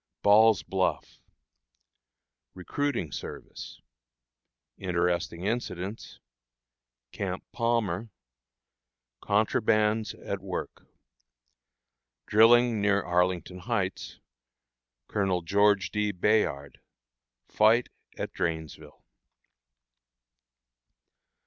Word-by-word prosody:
Ball's 105 Hz, -1 st, +5 dB
Bluff. 95 Hz, -1 st, -2 dB, 1.3 s
Recruiting 105 Hz, -, -2 dB
Service. -, -, -8 dB, 1.0 s
Interesting 90 Hz, -1 st, -1 dB
Incidents. 105 Hz, -2 st, -4 dB, 0.9 s
Camp 95 Hz, -2 st, -4 dB
Palmer. 115 Hz, -4 st, -1 dB, 1.1 s
"Contrabands" 110 Hz, +1 st, +1 dB
at 100 Hz, -1 st, -3 dB
Work. 95 Hz, -1 st, -6 dB, 1.4 s
Drilling 115 Hz, +1 st, +5 dB
near 100 Hz, -1 st, +2 dB
Arlington 90 Hz, +1 st, 0 dB
Heights. 95 Hz, -1 st, -3 dB, 0.9 s
Colonel 95 Hz, -4 st, -1 dB
George 100 Hz, 0 st, +2 dB
D. 105 Hz, 0 st, 0 dB
Bayard. 90 Hz, -8 st, 0 dB, 0.7 s
Fight 110 Hz, +3 st, +3 dB, 0.3 s
at -, -, -5 dB
Drainesville. 80 Hz, -4 st, -5 dB
100 Hz, 60 wpm, -28 LUFS, 90-110 Hz, 1.4 s, Ball's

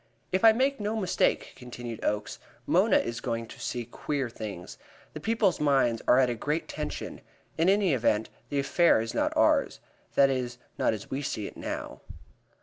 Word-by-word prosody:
"If 185 Hz, +2 st, 0 dB
I 225 Hz, -, +9 dB
make 265 Hz, +4 st, +1 dB
no 210 Hz, +1 st, -2 dB
mistake," 190 Hz, -5 st, 0 dB
continued 120 Hz, -2 st, -8 dB
Oakes, 105 Hz, 0 st, -2 dB, 0.3 s
"Mona -, -, +4 dB
is 120 Hz, 0 st, -2 dB
going 115 Hz, 0 st, -2 dB
to -, -, -13 dB
see 120 Hz, -2 st, -3 dB
queer 135 Hz, +2 st, -3 dB
doings. 105 Hz, -6 st, -8 dB, 0.3 s
The -, -, -6 dB
people's 225 Hz, -3 st, +1 dB
minds 135 Hz, -6 st, +2 dB
are 125 Hz, -, +6 dB
at 130 Hz, -1 st, +5 dB
a 120 Hz, -, -1 dB
great 150 Hz, +8 st, -2 dB
tension. -, -, -5 dB, 0.3 s
In 165 Hz, +3 st, +3 dB
any 195 Hz, -4 st, +3 dB
event, 110 Hz, -3 st, +1 dB, 0.2 s
this 140 Hz, -1 st, -1 dB
affair 170 Hz, -6 st, +4 dB
is 115 Hz, +1 st, -3 dB
not -, -, +1 dB
ours. -, -, +3 dB, 0.4 s
That 135 Hz, -1 st, +5 dB
is 125 Hz, -2 st, -2 dB, 0.2 s
not -, -, +1 dB
as 105 Hz, -, -10 dB
we 135 Hz, -, -2 dB
see 110 Hz, -7 st, -3 dB
it -, -, -8 dB
now." -, -, -6 dB
130 Hz, 180 wpm, -28 LUFS, 115-175 Hz, 0.4 s, I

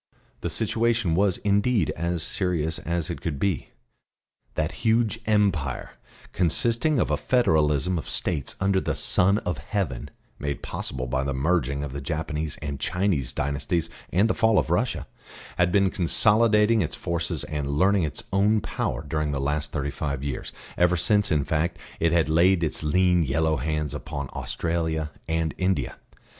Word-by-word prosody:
The 85 Hz, -, -3 dB
situation 110 Hz, +1 st, +1 dB
was 95 Hz, +1 st, +2 dB
indeed 100 Hz, -1 st, +2 dB
as 85 Hz, 0 st, -1 dB
serious 85 Hz, -4 st, -1 dB
as 85 Hz, 0 st, -2 dB
it 85 Hz, -, -6 dB
could 80 Hz, -4 st, -3 dB
be. 95 Hz, -3 st, -1 dB, 0.9 s
That 80 Hz, +2 st, 0 dB
huge 115 Hz, 0 st, +2 dB
Empire, 95 Hz, -, +1 dB, 0.4 s
consisting 115 Hz, -, +2 dB
of 75 Hz, -, +1 dB
a 75 Hz, -, +2 dB
federalism 80 Hz, -, +2 dB
of -, -, -7 dB
States 70 Hz, -, -1 dB
under 95 Hz, 0 st, +2 dB
the -, -, -2 dB
Son 100 Hz, +3 st, +3 dB
of 90 Hz, -, -2 dB
Heaven 100 Hz, -, -3 dB, 0.3 s
(made 70 Hz, -1 st, -3 dB
possible 65 Hz, -1 st, -4 dB
by 65 Hz, +2 st, -1 dB
the 70 Hz, -1 st, -2 dB
merging 70 Hz, -1 st, 0 dB
of 70 Hz, -3 st, -5 dB
the 70 Hz, -, -5 dB
Japanese 75 Hz, +1 st, -3 dB
and 70 Hz, -2 st, -4 dB
Chinese 85 Hz, -5 st, 0 dB
dynasties 70 Hz, +5 st, -1 dB, 0.2 s
and 100 Hz, +5 st, +3 dB
the -, -, +1 dB
fall 110 Hz, -2 st, +3 dB
of -, -, +1 dB
Russia), -, -, 0 dB, 0.5 s
had 90 Hz, 0 st, +3 dB
been 95 Hz, 0 st, +3 dB
consolidating 105 Hz, +4 st, +3 dB
its 80 Hz, -2 st, -2 dB
forces 85 Hz, -3 st, -2 dB
and 75 Hz, -2 st, -3 dB
learning 95 Hz, +7 st, +3 dB
its 75 Hz, -5 st, -3 dB
own 105 Hz, +3 st, +3 dB
power -, -, -3 dB
during 75 Hz, 0 st, -1 dB
the 70 Hz, -, -2 dB
last 75 Hz, +2 st, -1 dB
thirty 70 Hz, +1 st, -2 dB
five 70 Hz, -2 st, -3 dB
years, 70 Hz, -2 st, -4 dB, 0.3 s
ever 90 Hz, 0 st, +4 dB
since, 105 Hz, +4 st, +2 dB
in 75 Hz, -3 st, +2 dB
fact, 80 Hz, +3 st, 0 dB, 0.2 s
it 85 Hz, 0 st, +2 dB
had 85 Hz, -1 st, +3 dB
laid 85 Hz, +3 st, +4 dB
its 80 Hz, -, -1 dB
lean 90 Hz, +3 st, +3 dB
yellow 80 Hz, +2 st, +1 dB
hands 75 Hz, +1 st, -2 dB
upon 75 Hz, -2 st, -5 dB
Australia 80 Hz, +4 st, -2 dB, 0.2 s
and 80 Hz, -1 st, 0 dB
India. 90 Hz, -8 st, 0 dB
85 Hz, 160 wpm, -25 LUFS, 75-95 Hz, 0.9 s, ever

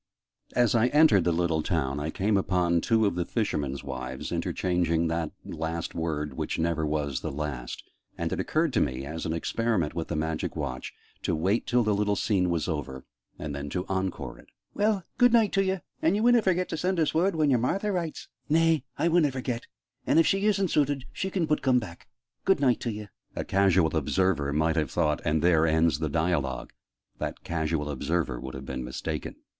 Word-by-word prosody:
As 120 Hz, -3 st, +4 dB
I 115 Hz, 0 st, +4 dB
entered 150 Hz, -, +5 dB
the 85 Hz, -, +3 dB
little 85 Hz, -1 st, +1 dB
town, 70 Hz, -2 st, -1 dB
I 75 Hz, +2 st, -2 dB
came 100 Hz, +5 st, 0 dB
upon 90 Hz, -3 st, +2 dB
two 110 Hz, +2 st, +3 dB
of 100 Hz, -, +2 dB
the 90 Hz, 0 st, -1 dB
fishermen's 75 Hz, -, -2 dB
wives 65 Hz, -1 st, -5 dB
interchanging 85 Hz, -2 st, 0 dB
that 80 Hz, -1 st, -1 dB, 0.2 s
last 80 Hz, +1 st, -4 dB
word 75 Hz, -3 st, -2 dB
"which -, -, -3 dB
never 80 Hz, -1 st, 0 dB
was 75 Hz, -3 st, -1 dB
the -, -, -3 dB
last": 70 Hz, -4 st, -5 dB, 0.3 s
and -, -, -2 dB
it -, -, -3 dB
occurred -, -, +1 dB
to -, -, +3 dB
me, 65 Hz, +1 st, -1 dB
as 80 Hz, +3 st, -4 dB
an 80 Hz, -, -1 dB
experiment 95 Hz, -1 st, 0 dB
with 85 Hz, -2 st, -3 dB
the 85 Hz, -, -3 dB
Magic 80 Hz, 0 st, -2 dB
Watch, 65 Hz, 0 st, -4 dB, 0.3 s
to -, -, 0 dB
wait 95 Hz, +8 st, 0 dB
till 120 Hz, 0 st, +3 dB
the 105 Hz, -1 st, +2 dB
little 105 Hz, 0 st, +1 dB
scene 95 Hz, -3 st, +1 dB
was 85 Hz, -2 st, 0 dB
over, 70 Hz, -5 st, -4 dB, 0.3 s
and 75 Hz, -2 st, -5 dB
then 70 Hz, 0 st, -5 dB
to 90 Hz, +5 st, -3 dB
'encore' 95 Hz, -1 st, -3 dB
it. -, -, -17 dB, 0.3 s
"Well, 205 Hz, -2 st, +1 dB, 0.2 s
good 245 Hz, -1 st, +6 dB
night 225 Hz, -4 st, +4 dB
t'ye! 190 Hz, -1 st, +1 dB, 0.2 s
And 165 Hz, +4 st, +3 dB
ye 210 Hz, -, 0 dB
winna 240 Hz, 0 st, +5 dB
forget 185 Hz, -2 st, +1 dB
to -, -, -3 dB
send 180 Hz, +3 st, 0 dB
us 160 Hz, -, +2 dB
word 175 Hz, +3 st, +2 dB
when 155 Hz, -3 st, +3 dB
your 125 Hz, -, +4 dB
Martha 195 Hz, -, 0 dB
writes?" 170 Hz, -4 st, -3 dB, 0.2 s
"Nay, 165 Hz, -2 st, +3 dB
ah 165 Hz, -, +2 dB
winna 165 Hz, -4 st, +3 dB
forget. 125 Hz, -2 st, -4 dB, 0.4 s
An' -, -, +3 dB
if 165 Hz, -, +6 dB
she 195 Hz, +2 st, +2 dB
isn't 195 Hz, -3 st, +2 dB
suited, 145 Hz, -2 st, +1 dB
she 190 Hz, -, -2 dB
can 180 Hz, -3 st, 0 dB
but 150 Hz, -1 st, 0 dB
coom 130 Hz, -2 st, +3 dB
back. 100 Hz, -8 st, -5 dB, 0.4 s
Good 195 Hz, -4 st, +3 dB
night 130 Hz, -4 st, +3 dB
t'ye!" 105 Hz, -3 st, -4 dB, 0.3 s
A -, -, -2 dB
casual 95 Hz, -4 st, +3 dB
observer 80 Hz, -1 st, +1 dB
might 80 Hz, +2 st, +1 dB
have 75 Hz, -4 st, +1 dB
thought 75 Hz, -1 st, 0 dB
"and 75 Hz, +1 st, +1 dB
there 80 Hz, -2 st, +4 dB
ends 80 Hz, +1 st, +3 dB
the 80 Hz, -, -1 dB
dialogue!" 80 Hz, -4 st, -1 dB, 0.5 s
That -, -, -4 dB
casual 80 Hz, -2 st, -1 dB
observer 70 Hz, -2 st, -1 dB
would 65 Hz, +1 st, -7 dB
have 65 Hz, 0 st, -7 dB
been 65 Hz, -1 st, -4 dB
mistaken. 65 Hz, +1 st, -4 dB
90 Hz, 200 wpm, -27 LUFS, -, 0.5 s, good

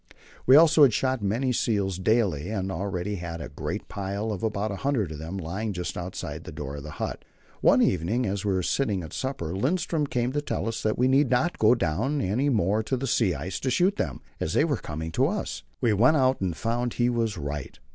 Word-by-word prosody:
We 130 Hz, -, +8 dB
also 155 Hz, -2 st, +7 dB
shot 130 Hz, +2 st, 0 dB
many 115 Hz, +6 st, 0 dB
seals 100 Hz, -6 st, 0 dB
daily, 95 Hz, -6 st, +1 dB
and 95 Hz, -3 st, -2 dB
we -, -, -3 dB
already 95 Hz, +2 st, -3 dB
had 85 Hz, -1 st, -5 dB
a -, -, -6 dB
great 70 Hz, -, -5 dB
pile 100 Hz, +2 st, -3 dB
of 100 Hz, -, -4 dB
about 110 Hz, -1 st, -1 dB
a 100 Hz, -, -4 dB
hundred 125 Hz, -, 0 dB
of 75 Hz, -, -7 dB
them 80 Hz, +5 st, -5 dB
lying 95 Hz, +5 st, -3 dB
just 90 Hz, -1 st, -4 dB
outside 90 Hz, +1 st, -5 dB
the -, -, -8 dB
door 75 Hz, -2 st, -6 dB
of -, -, -6 dB
the 75 Hz, -, -8 dB
hut. -, -, -4 dB, 0.4 s
One -, -, +5 dB
evening 100 Hz, +9 st, +1 dB
as 100 Hz, -1 st, -2 dB
we 105 Hz, -, +1 dB
were 95 Hz, -1 st, 0 dB
sitting 100 Hz, -4 st, 0 dB
at 80 Hz, -, -9 dB
supper 110 Hz, -, -3 dB
Lindström 150 Hz, -, 0 dB
came 120 Hz, 0 st, 0 dB
in -, -, -10 dB
to 145 Hz, -, 0 dB
tell 145 Hz, -, -3 dB
us 115 Hz, -, -3 dB
that 110 Hz, -, 0 dB
we 125 Hz, -, +3 dB
need 135 Hz, 0 st, +4 dB
not 155 Hz, +8 st, +1 dB
go 110 Hz, +3 st, +6 dB
down 120 Hz, -, 0 dB
any 125 Hz, +7 st, +1 dB
more 105 Hz, -3 st, +2 dB
to 130 Hz, +4 st, -1 dB
the 135 Hz, -, -3 dB
sea 110 Hz, -, +2 dB
ice 85 Hz, +6 st, -4 dB
to 130 Hz, -, -1 dB
shoot 185 Hz, +9 st, +2 dB
them, -, -, -2 dB, 0.2 s
as -, -, -2 dB
they -, -, +4 dB
were -, -, 0 dB
coming 80 Hz, +2 st, -5 dB
up -, -, -11 dB
to 130 Hz, +2 st, +3 dB
us. 205 Hz, +5 st, -3 dB, 0.2 s
We 120 Hz, -4 st, +3 dB
went 125 Hz, +10 st, +5 dB
out 130 Hz, -3 st, +2 dB
and 90 Hz, -4 st, -1 dB
found 120 Hz, +1 st, -1 dB
he 120 Hz, -, +2 dB
was 115 Hz, -4 st, 0 dB
right. 75 Hz, -2 st, -5 dB
105 Hz, 235 wpm, -26 LUFS, 90-130 Hz, 0.4 s, We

